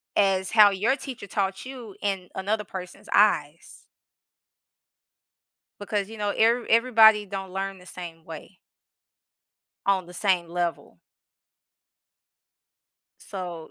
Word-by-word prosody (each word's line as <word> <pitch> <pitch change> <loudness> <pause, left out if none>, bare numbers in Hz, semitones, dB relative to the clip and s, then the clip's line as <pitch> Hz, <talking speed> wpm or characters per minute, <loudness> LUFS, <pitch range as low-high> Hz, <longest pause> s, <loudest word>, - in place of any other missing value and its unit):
as 190 -2 +2
how 210 -2 +7
your 210 +7 +1
teacher 260 -7 -8
taught 195 +1 -2
you 245 -6 -9
in 195 -3 -2
another 210 +3 -1
person's 185 -2 -9
eyes 165 -7 +1 2.0
because, 205 0 -2
you 225 0 -10
know, 205 -1 -1
every 230 +2 +2
everybody 225 -3 +6
don't 195 -1 -6
learn 195 0 -4
the 180 - -17
same 170 -3 -9
way 165 +3 -11 1.3
on 190 -3 +1
the 180 - -13
same 180 -3 +1
level. 175 0 -3 2.2
so, 175 -5 -7
195 Hz, 110 wpm, -25 LUFS, 180-215 Hz, 2.2 s, how